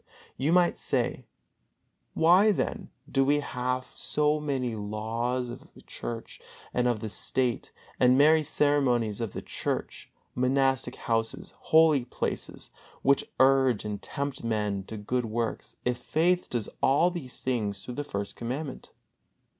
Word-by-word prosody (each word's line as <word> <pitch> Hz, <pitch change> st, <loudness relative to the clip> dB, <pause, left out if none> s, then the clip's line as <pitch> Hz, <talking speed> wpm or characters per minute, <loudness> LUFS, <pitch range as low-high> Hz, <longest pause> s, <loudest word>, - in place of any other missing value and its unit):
You 145 Hz, +4 st, 0 dB
might 175 Hz, 0 st, +4 dB
say: -, -, -1 dB, 0.9 s
"Why 180 Hz, +6 st, +6 dB
then 200 Hz, -, -2 dB, 0.2 s
do 135 Hz, -, +2 dB
we 145 Hz, +2 st, +3 dB
have 125 Hz, -1 st, -3 dB
so 150 Hz, 0 st, +1 dB
many 135 Hz, -5 st, -2 dB
laws 115 Hz, +4 st, -2 dB
of -, -, -11 dB
the -, -, -15 dB
Church 115 Hz, -1 st, -7 dB, 0.3 s
and 125 Hz, 0 st, +2 dB
of 120 Hz, -3 st, 0 dB
the 110 Hz, -, -3 dB
State, 125 Hz, +3 st, 0 dB, 0.3 s
and 125 Hz, 0 st, +5 dB
many 155 Hz, +3 st, +6 dB
ceremonies 135 Hz, -7 st, +2 dB
of 115 Hz, -4 st, -3 dB
churches, -, -, -3 dB, 0.2 s
monastic 130 Hz, 0 st, +1 dB
houses, 115 Hz, -1 st, -1 dB
holy 155 Hz, -5 st, +4 dB
places, -, -, -4 dB, 0.3 s
which 140 Hz, +1 st, +3 dB
urge 130 Hz, -4 st, +4 dB
and 105 Hz, -1 st, -4 dB
tempt 140 Hz, -2 st, -4 dB
men 105 Hz, -4 st, -1 dB
to 110 Hz, -, -7 dB
good 120 Hz, +4 st, -1 dB
works, 115 Hz, +1 st, -3 dB
if 125 Hz, 0 st, 0 dB
faith 175 Hz, +3 st, +1 dB
does 120 Hz, -4 st, -2 dB
all 155 Hz, +7 st, +4 dB
things 125 Hz, -, -3 dB
through 125 Hz, -, -6 dB
the 145 Hz, -, -3 dB
First 100 Hz, -7 st, -5 dB
Commandment?" 130 Hz, +4 st, -5 dB
125 Hz, 135 wpm, -28 LUFS, 115-145 Hz, 0.9 s, Why